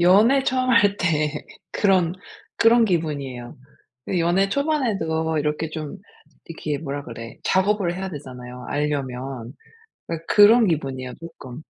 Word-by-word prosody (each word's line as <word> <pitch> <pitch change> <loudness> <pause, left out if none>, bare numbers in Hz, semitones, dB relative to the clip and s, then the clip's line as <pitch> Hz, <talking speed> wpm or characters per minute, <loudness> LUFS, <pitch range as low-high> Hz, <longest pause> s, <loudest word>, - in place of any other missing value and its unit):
연애 215 +10 +5
처음 255 -1 +1
할 205 -4 +4
때 155 -5 0 0.4
그런, 185 -4 +2 0.4
그런 230 0 +5
기분이에요. 145 - -3 0.6
연애 175 +4 +2
초반에도 195 - 0
이렇게 150 +1 -1
좀 155 +4 -6 0.5
이렇게 155 -3 -4
뭐라 145 -2 -5
그래 115 -1 -9
작업을 190 -2 +1
해야 190 +1 -4
되잖아요, 125 -4 -9
알려면. 135 -4 -3 0.5
그니까 165 -1 -4
그런 220 +2 +6
기분이에요 135 -6 -2
쪼끔. 145 -5 -10
160 Hz, 285 characters per minute, -23 LUFS, 140-200 Hz, 0.6 s, 그런